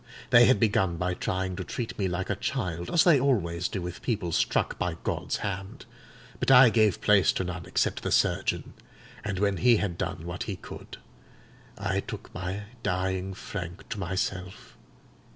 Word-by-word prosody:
They 120 -1 +8
had 130 - +4
begun 95 -6 +2
by 90 +1 -1
trying 95 +1 -2
to 95 - -3
treat 115 +6 -5
me 95 - +1
like 90 +2 -2
a - - 0
child, 90 -7 -3
as 170 - +4
they 165 -6 +6
always 90 -11 +1
do 95 - -4
with 90 0 -6
people 105 -8 -1
struck - - +1
by 85 -2 -1
God's - - -2
hand; 100 -1 -5 0.5
but - - 0
I 125 -3 +8
gave 110 -5 +3
place 105 -3 +5
to - - -1
none 90 -1 -5
except - - 0
the - - -3
surgeon; - - +1 0.5
and 100 -3 -3
when 100 0 +1
he 120 +3 +5
had 90 -5 -2
done 90 -3 -3
what 85 +1 -5
he 100 - -2
could, - - -10 0.8
I - - -1
took - - -8
my 95 +3 -4 0.2
dying 95 0 -1
Frank 90 -3 -7
to 105 - -4
myself. 95 0 -4
95 Hz, 175 wpm, -28 LUFS, 90-105 Hz, 0.8 s, They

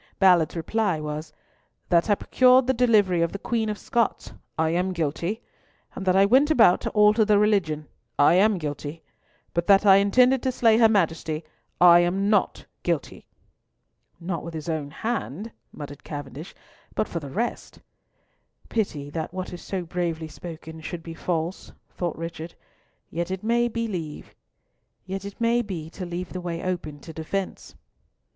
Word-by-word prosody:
Ballard's 180 -5 +4
reply 185 +1 0
was, 150 +1 -5 0.6
"That 170 +3 +3
I 205 - +5
procured 255 +4 +4
the 260 - +2
delivery 215 -8 +3
of 170 - 0
the - - -3
Queen 220 +1 -1
of 210 - -3
Scots, 235 0 -1 0.2
I 160 0 +1
am 180 +2 0
guilty; 170 +7 -2 0.5
and 190 - -7
that 185 - +4
I 195 +1 +6
went 265 +8 +4
about 225 - +5
to - - -2
alter 210 +1 +4
the 210 -1 +4
religion, 185 -8 +1 0.3
I 145 - +5
am 200 +3 +4
guilty; 150 0 -5 0.5
but 170 0 -1
that 200 +1 +5
I 195 -1 +8
intended 250 +6 +4
to 260 - 0
slay 225 -3 +3
her 225 -2 +6
Majesty, 165 -5 0 0.4
I 175 -1 +8
am 190 +4 +1
not 210 - +1 0.2
guilty." - - -3 0.9
"Not 170 0 -4
with 170 0 -7
his 155 0 -6
own 155 -3 -2
hand," 220 - -4 0.2
muttered 145 -1 -9
Cavendish, 145 +2 -8 0.4
"but - - 0
for 170 - -4
the 145 -3 -8
rest—" 230 - -4 0.9
"Pity 150 -10 -2
that 160 0 -4
what 185 0 -5
is 175 - -8
so 190 -2 -4
bravely 165 -2 -3
spoken 160 0 -9
should 165 +1 -6
be 165 - -7
false," 165 +1 -3 0.2
thought 175 -2 -3
Richard, 165 0 -7 0.6
"yet 170 +2 -3
it 190 +1 -4
may 235 +2 +2
be 230 0 -2 1.2
to 200 -4 -2
leave 175 0 -5
the 185 - -4
way 170 -1 -4
open 175 -5 -4
to 160 - -10
defence." 185 +5 -5
180 Hz, 155 wpm, -25 LUFS, 160-210 Hz, 1.2 s, I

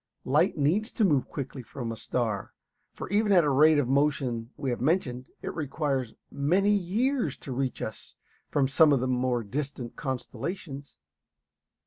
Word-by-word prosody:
Light - - +2
needs 175 - +1
to 220 - +2
move 145 -8 +2
quickly 135 -1 -6
coming - - -17
from 120 -4 -4
a - - -4
star, 110 -3 -2 0.4
for - - -7
even 205 +2 +2
at 185 -3 +7
the 150 -3 +1
rate 155 +3 +6
of 145 -4 +2
motion 135 -4 +1
we 135 -3 -2
have 120 - -3
mentioned 130 -4 0
it - - -3
requires 140 -5 -2 0.2
many 180 +9 +2
years 205 - 0
to 135 - -8
reach 130 0 -2
us 110 - -7 0.3
from 140 -2 +2
some 150 +3 +5
of 135 - +3
the 130 - -1
more 125 -1 0
distant 130 +1 -5
constellations. 140 - -5
140 Hz, 165 wpm, -28 LUFS, 125-160 Hz, 0.4 s, at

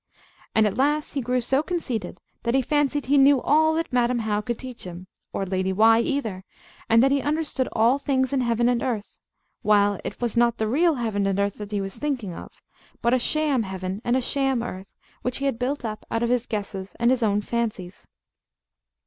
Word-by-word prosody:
And 220 - +5
at 210 +3 -1
last 295 +2 +1
he 280 - -1
grew 250 +1 0
so 265 +4 +1
conceited 250 - -4 0.2
that 235 +2 0
he 270 - +3
fancied 290 +1 0
he 280 +2 +4
knew 275 0 +6
all 315 +4 +3
that 330 -4 -2
Madam 245 0 +2
How 215 -2 -1
could 235 +2 -3
teach 255 -2 -9
him, 180 0 -8 0.3
or 195 - -2
Lady 190 0 -1
Why 225 +4 +5
either, 230 -8 -2 0.5
and 230 +2 +6
that 270 - +4
he 280 0 +2
understood 295 -3 -1
all 235 +5 +3
things 265 -1 0
in 270 - +2
heaven 235 -1 +1
and 245 -1 +1
earth; 230 -6 -4 0.4
while 205 -2 +3
it - - -6
was 240 -3 -2
not 235 0 +3
the 220 - -1
real 320 +7 +3
heaven 215 -5 -1
and 195 0 0
earth 200 0 -1
that 210 0 -7
he 205 -1 -1
was 195 0 -6
thinking 255 -11 -2
of, - - -9 0.5
but 235 +1 +3
a 255 - +4
sham 295 0 +1
heaven 190 0 -5
and 240 +2 +2
a - - 0
sham 270 -2 0
earth, 190 -4 -7 0.3
which 250 0 -2
he 275 - -3
had 265 -4 -1
built 265 +1 -2
up 215 -1 -5
out 230 +1 -1
of 235 - +1
his 245 -1 +1
guesses 200 -3 -5
and 235 +1 +3
his 255 -1 +1
own 205 -2 +2
fancies. 210 -6 -4
235 Hz, 215 wpm, -24 LUFS, 210-270 Hz, 0.5 s, knew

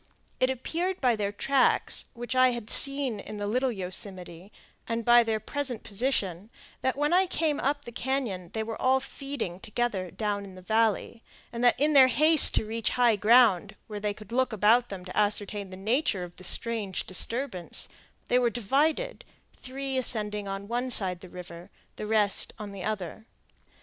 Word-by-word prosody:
It 255 - +3
appeared 335 +9 -2
by 250 -3 +2
their 205 -2 -2
tracks, 265 +5 +2
which 240 +1 -5
I 255 -1 +5
had 235 -3 -6
seen 275 -5 +1
in 215 - -8
the 205 - -3
Little 250 +5 0
Yosemite, 185 -2 -4 0.4
and 230 -1 -3
by 240 0 +7
their 225 -2 -1
present 260 +1 -4
position, 205 -4 -2 0.3
that 260 - 0
when 295 +3 +1
I 375 +1 +4
came 315 -4 0
up 285 +1 -1
the 240 - -8
cañon 235 -9 -3
they 220 - -2
were 225 0 -6
all 260 +1 +3
feeding 265 -9 -6
together 215 -4 -2
down 205 +1 -3
in 190 -2 -11
the 185 - -12
valley, 225 +2 0 0.3
and 240 +1 +4
in 300 +2 +2
their 265 -2 +8
haste 305 +4 +7
to - - +1
reach 225 +1 -2
high 240 -3 +4
ground, 210 -2 +4
where 210 -1 -7
they 205 0 -2
could 215 -1 -14
look 260 +1 +1
about 225 +3 +3
them 185 -2 -7
to 185 - -9
ascertain 205 -1 0
the 185 - -9
nature 215 - 0
of 175 0 -10
the 185 - -11
strange 210 0 -2
disturbance, 215 0 -3 0.4
they 250 - +3
were 245 -1 +2
divided, 290 - 0 0.3
three 265 +1 -4
ascending 210 -4 -2
on 195 +1 -5
one 245 +3 -2
side 185 -7 0
the 185 - -12
river, 175 -1 -10 0.3
the 210 - -5
rest 210 -2 +1
on 210 -2 -7
the 195 -2 -8
other. 215 +1 -5
225 Hz, 180 wpm, -27 LUFS, 200-255 Hz, 0.4 s, their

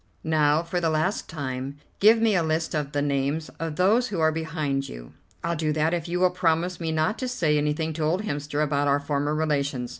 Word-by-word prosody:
Now, 155 0 +2
for 175 +1 -2
the 165 - +2
last 160 +6 -1
time, 135 -2 -4 0.2
give 220 +3 +6
me 225 -1 +3
a 180 - +3
list 160 0 -1
of 150 -2 -2
the 145 -1 0
names 145 +2 -1
of 165 -1 -3
those 215 +9 +3
who 195 -5 -3
are 160 0 +4
behind 155 -4 -2
you." - - -10 0.3
"I'll 170 - 0
do 155 -1 0
that 155 +2 +1
if 170 -2 -2
you 175 +1 -1
will 185 0 +4
promise 175 0 0
me 165 -2 -2
not 160 +7 0
to 255 - -2
say 170 -12 +1
anything 150 +2 0
to 155 0 -3
old 175 +7 +1
Hemster 145 -4 -2
about 145 -1 0
our 140 0 +3
former 145 +1 -1
relations." 140 -5 -1
155 Hz, 220 wpm, -25 LUFS, 145-170 Hz, 0.3 s, give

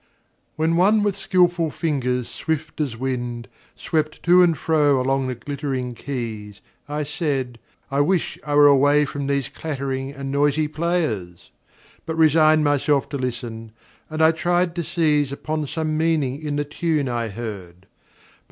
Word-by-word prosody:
WHEN 160 +2 +1
one 205 +4 +4
with 205 -2 0
skillful 180 -4 +2
fingers 125 -6 -1
swift 155 -1 -3
as 130 -7 -2
wind 120 -2 -3 0.3
Swept 155 -2 -2
to 180 +1 +6
and 170 -3 +4
fro 145 -4 +2
along 135 +1 0
the 130 - -3
glittering 130 0 -4
keys, 110 -6 -6 0.3
I 150 +1 -2
said: 140 -5 -2 0.3
I 140 +1 +2
wish 175 +3 0
I 145 -1 -2
were 145 0 +7
away 145 +1 +5
from 140 0 -4
these 140 -2 0
Clattering 135 -3 -4
and 140 -1 -6
noisy 145 +2 +2
players! 150 - -2 0.6
but 160 - -2
resigned 155 -1 +5
Myself 145 -1 +1
to 145 - -3
listen, 115 -3 -5 0.4
and 155 0 0
I 160 - +7
tried 175 +1 0
to 170 - -1
seize 150 -4 +1
Upon 155 +1 -3
some 155 +1 -2
meaning 155 -4 0
in 150 -2 -3
the 145 0 -1
tune 150 -1 -1
I 120 -2 -2
heard. 95 -5 -8
145 Hz, 150 wpm, -22 LUFS, 130-160 Hz, 0.6 s, were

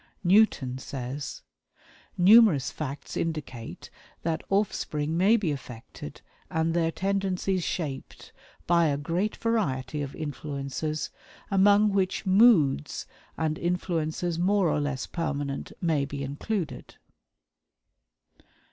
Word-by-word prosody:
Newton 175 -10 +3
says: 135 +2 -6 0.7
"Numerous 190 - +6
facts 145 -2 -6
indicate 150 -8 -5 0.3
that 160 -1 -1
offspring 160 -6 0
may 200 +7 +5
be 185 -8 -1
affected 120 - -8 0.3
and 160 0 0
their 165 -1 +1
tendencies 190 -1 -1
shaped 145 -7 -5 0.3
by 170 -1 +4
a 140 -2 +1
great 170 +8 -1
variety 150 - -1
of 140 -1 -5
influences, 145 0 -4 0.4
among 205 +2 +5
which 195 +1 0
moods 185 - +4 0.3
and 155 -1 -1
influences 170 -1 -1
more 190 0 +3
or 150 - +1
less 145 -3 -2
permanent 145 -4 -3
may 160 -5 +1
be 140 0 -5
included." 150 - -4
160 Hz, 105 wpm, -27 LUFS, 140-190 Hz, 0.7 s, Numerous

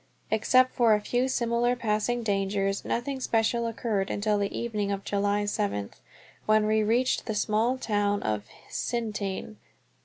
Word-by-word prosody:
Except 255 +4 +4
for 230 -3 +4
a - - 0
few 245 +4 0
similar 240 -1 +1
passing 235 +1 -1
dangers, 195 -1 0
nothing 265 +3 -2
special 235 -1 +1
occurred 220 -4 -1
until 210 0 0
the 200 0 0
evening 210 -4 -2
of 195 0 -3
July 205 +1 0
seventh, 200 - -2 0.5
when 215 0 +4
we 215 0 +2
reached 235 +4 +1
the 220 - -2
small 220 +5 +1
town 205 -4 0
of 105 -1 -1 0.3
Hsintien. 215 -3 -3
215 Hz, 145 wpm, -27 LUFS, 205-235 Hz, 0.5 s, Except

